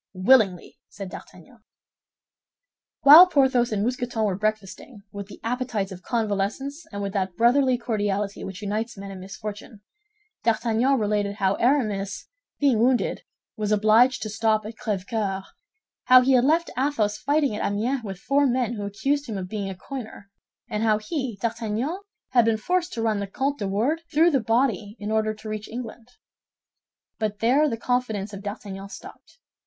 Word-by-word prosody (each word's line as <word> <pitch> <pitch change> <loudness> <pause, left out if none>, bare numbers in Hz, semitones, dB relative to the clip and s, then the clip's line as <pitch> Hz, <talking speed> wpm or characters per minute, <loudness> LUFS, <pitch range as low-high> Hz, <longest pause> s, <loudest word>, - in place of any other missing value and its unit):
"Willingly," 190 -3 +3
said 195 -2 -8
D'Artagnan. 215 +6 -13 1.4
While 310 +6 +10
Porthos 265 -7 +2
and 205 -1 0
Mousqueton 245 -1 -2
were 200 -3 +1
breakfasting, 215 +2 -4
with 200 -1 -7
the - - -12
appetites 230 -5 -2
of 185 -1 -9
convalescents 230 - -2
and 200 -1 -4
with 195 -1 -4
that 190 -3 -2
brotherly 255 +2 +4
cordiality 205 -4 -2
which 190 +1 -7
unites 215 +3 -3
men 195 0 -8
in 190 - -8
misfortune, 205 +2 -8 0.6
D'Artagnan 235 +3 +2
related 205 -2 0
how 195 -2 +1
Aramis, 215 -6 0 0.3
being 275 -6 +3
wounded, 245 +1 +1 0.3
was 210 -1 -2
obliged 215 +5 +4
to 215 - -4
stop 215 -1 +1
at 220 - -6
Crèvecœur, 200 -2 -3 0.6
how 255 0 +8
he 260 +2 +2
had 255 -1 +4
left 330 +4 +2
Athos 230 -6 0
fighting 285 -4 +1
at - - -3
Amiens 235 +6 -1
with 195 -3 -6
four 280 +8 +2
men 245 -2 0
who 205 -3 -4
accused 275 +8 -1
him 215 -3 -4
of 185 -1 -5
being 200 -2 -3
a 190 - -6
coiner, 215 -2 -9 0.4
and 210 - -3
how 220 -1 +3
he, 240 0 -4
D'Artagnan, 230 - -2 0.3
had 245 -2 +5
been 225 -1 +2
forced 360 +9 -1
to 230 - -3
run 215 -2 +1
the 200 - -3
Comtes 275 +8 -2
de 200 - -2
Wardes 240 +12 0
through 330 +3 +4
the 275 - +3
body 225 -3 0
in 210 +1 -5
order 215 0 0
to 215 - -11
reach 215 0 -5
England. 235 0 -7 1.1
But 215 -2 -2
there 270 +8 +3
the 230 - -3
confidence 220 -4 -2
of 200 - -7
D'Artagnan 200 -1 -7
stopped. - - -13
220 Hz, 165 wpm, -24 LUFS, 205-255 Hz, 1.4 s, While